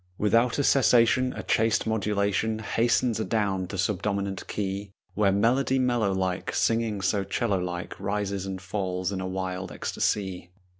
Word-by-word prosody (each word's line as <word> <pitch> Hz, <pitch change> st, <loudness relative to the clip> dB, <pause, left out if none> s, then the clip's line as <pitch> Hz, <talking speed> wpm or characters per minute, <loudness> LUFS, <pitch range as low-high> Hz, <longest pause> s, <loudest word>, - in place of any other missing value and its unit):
Without 115 Hz, +3 st, +2 dB
a 145 Hz, -, +1 dB
cessation 130 Hz, -1 st, +4 dB
A -, -, -6 dB
chaste 115 Hz, -1 st, +2 dB
modulation 105 Hz, 0 st, 0 dB
Hastens 115 Hz, +1 st, +1 dB
adown 100 Hz, -4 st, 0 dB
to 95 Hz, -, -6 dB
subdominant 100 Hz, +1 st, -1 dB
key, 100 Hz, 0 st, -3 dB, 0.2 s
Where 100 Hz, -1 st, +3 dB
melody 125 Hz, +7 st, +2 dB
mellow 120 Hz, -5 st, +1 dB
like 95 Hz, -1 st, -2 dB
Singing 115 Hz, -3 st, +1 dB
so 100 Hz, +1 st, +1 dB
'cello 100 Hz, -1 st, 0 dB
like 90 Hz, -1 st, -5 dB
Rises 100 Hz, -1 st, -2 dB
and 95 Hz, -1 st, -4 dB
falls 95 Hz, -1 st, -3 dB
in 95 Hz, -1 st, -3 dB
a 95 Hz, -, -3 dB
wild 95 Hz, 0 st, -4 dB
ecstasy. 95 Hz, -4 st, -2 dB
100 Hz, 145 wpm, -27 LUFS, 95-115 Hz, 0.2 s, cessation